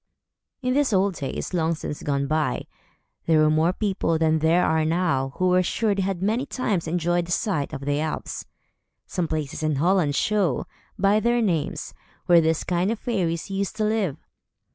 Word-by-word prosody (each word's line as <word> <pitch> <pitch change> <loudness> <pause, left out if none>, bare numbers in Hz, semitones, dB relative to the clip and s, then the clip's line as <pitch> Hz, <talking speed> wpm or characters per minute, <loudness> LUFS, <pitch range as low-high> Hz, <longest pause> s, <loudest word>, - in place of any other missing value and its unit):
In 255 0 +1
these 275 -4 +2
old 195 +1 +3
days, 145 +3 -5
long 165 -1 +1
since 150 -1 -6
gone 140 -1 -1
by, 155 +2 -1 0.6
there 160 -1 +4
were 155 0 +4
more 160 +3 +3
people 190 -5 0
than 160 0 +2
there 165 +3 +3
are 160 0 +2
now, 155 -5 0
who 185 0 +1
were 180 0 +4
sure 210 +4 0
they 200 - -1
had 190 -1 -2
many 220 +6 +1
times 200 -10 -1
enjoyed 175 +1 0
the - - -7
sight 170 -6 0
of 145 -3 -6
the 145 0 0
elves. 155 0 -4 0.6
Some 180 -3 -2
places 155 -2 -3
in 155 -1 0
Holland 165 -1 +2
show, 200 -8 +1 0.3
by 200 +1 +3
their 240 +2 +2
names, 180 -9 -1 0.3
where 175 -1 +6
this 160 0 +1
kind 180 +2 0
of 230 - -2
fairies 185 -6 -2
used 195 +1 -2
to 215 - -1
live. 210 -8 0
175 Hz, 185 wpm, -24 LUFS, 155-195 Hz, 0.6 s, where